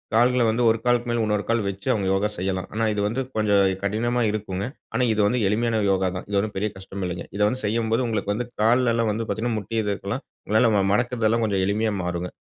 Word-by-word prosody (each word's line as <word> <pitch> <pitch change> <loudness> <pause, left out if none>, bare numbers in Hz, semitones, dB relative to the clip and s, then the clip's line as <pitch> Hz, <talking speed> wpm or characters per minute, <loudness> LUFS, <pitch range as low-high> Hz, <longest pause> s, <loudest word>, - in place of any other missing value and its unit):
கால்கள 125 +1 +4
வந்து 115 +2 +1
1 115 - +3
காலுக்கு 120 0 +2
மேல் 120 -1 +1
உன்னொரு 105 -1 0
கால் 115 -1 +2
வெச்சு 100 +4 -5
அவுங்க 100 -4 -1
யோகா 100 +2 +1
செய்யலாம். 95 0 -2
ஆனா 115 +1 0
இது 105 - -1
வந்து 115 +5 -1
கொஞ்சம் 105 -2 +3 0.2
கடினமா 120 +4 0
இருக்குங்க. 100 -2 -3 0.3
ஆனா 125 +2 +1
இது 105 - +1
வந்து 125 +3 +1
எளிமையான 110 +2 +1
யோகா 95 -1 +1
தான். 90 - -5
இது 100 - 0
ஒண்ணும் 105 +1 -2
பெரிய 105 +2 0
கஷ்டம் 95 0 -7
இல்லைங்க. 90 0 -4
இத 105 - -2
வந்து 130 +4 -2
செய்யும்போது 115 +2 +1
உங்களுக்கு 105 -3 -1
வந்து 120 +4 -2 0.2
கால்லல்லாம் 115 0 +3
வந்து 115 +1 -3
பாத்தீங்கன்னா, 115 0 -1
முட்டி 105 +3 -7
இதுக்கெல்லாம் 105 +5 -3 0.2
உங்களால 110 +3 +3
வ - - +3
மடக்கறதெல்லாம் 115 0 +1
கொஞ்சம் 100 -3 0
எளிமையா 105 +1 0
மாறுங்க. 90 0 -3
110 Hz, 215 wpm, -24 LUFS, 100-115 Hz, 0.3 s, கால்கள